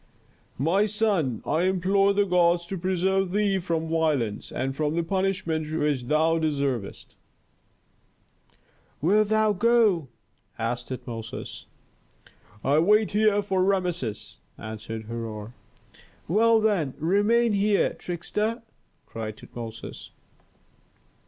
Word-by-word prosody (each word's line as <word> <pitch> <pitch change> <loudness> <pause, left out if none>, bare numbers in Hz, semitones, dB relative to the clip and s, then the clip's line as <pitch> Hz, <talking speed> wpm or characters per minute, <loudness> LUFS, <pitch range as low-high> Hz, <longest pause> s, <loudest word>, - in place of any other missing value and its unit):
"My 180 - +2
son, 200 - 0
I 160 +4 +1
implore 190 +2 +2
the 200 0 +2
gods 175 -2 +3
to 195 - -5
preserve 190 +1 0
thee 200 -2 +2
from 165 -3 -2
violence, 155 -10 -1
and 135 +1 -2
from 150 +1 -1
the 170 - +1
punishment 170 -4 -1
which 150 -5 0
thou 160 +4 +2
deservest." 140 -9 -2 1.8
"Wilt 205 +7 +3
thou 215 0 +3
go?" 210 - +3 0.5
asked 120 +2 -3
Tutmosis. 120 -3 -7 1.0
"I 145 +3 +3
wait 210 +5 +3
here 210 -1 +3
for 190 -2 +1
Rameses," 180 - -2 0.2
answered 110 0 -7
Herhor. 110 -1 -6 0.7
"Well, 225 +5 +4
then, 195 -11 0
remain 205 +8 +2
here, 200 0 +2
trickster!" 210 +7 -3 0.4
cried 110 -1 -6
Tutmosis. 115 -1 -9
170 Hz, 105 wpm, -26 LUFS, 135-200 Hz, 1.8 s, Well